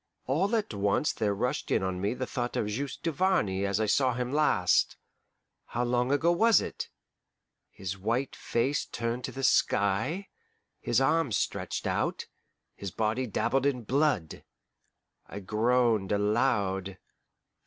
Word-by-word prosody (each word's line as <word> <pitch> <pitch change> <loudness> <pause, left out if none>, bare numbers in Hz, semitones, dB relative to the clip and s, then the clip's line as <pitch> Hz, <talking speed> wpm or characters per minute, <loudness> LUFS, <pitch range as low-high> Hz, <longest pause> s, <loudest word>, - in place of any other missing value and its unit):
All 185 - +1
at 215 - -1
once 100 +8 +1
there 105 -2 0
rushed 125 +5 -2
in - - +1
on 95 -1 -2
me 105 +5 0
the 130 - -3
thought 120 -2 -3
of - - 0
Juste 125 +8 -4
Duvarney 155 - +1
as 100 +1 0
I 110 - +2
saw 130 +3 +2
him 125 +1 -3
last 145 -12 +2 0.7
how 120 - -2
long 125 +1 +1
ago 160 +4 +3
was 225 +6 +5
it? - - -5 0.8
his 95 0 -6
white 115 +7 -1
face 135 +5 0
turned 120 +1 -3
to - - -5
the 135 - -6
sky, 115 - +1 0.5
his - - +1
arms 160 -9 +2
stretched - - -3
out, - - -1 0.5
his 100 - -6
body 110 +6 -1
dabbled 135 +5 +1
in 125 -4 -1
blood. 130 - 0 0.8
I 100 - -7
groaned 110 0 +1
aloud. 100 -3 +1
120 Hz, 145 wpm, -29 LUFS, 100-135 Hz, 0.8 s, was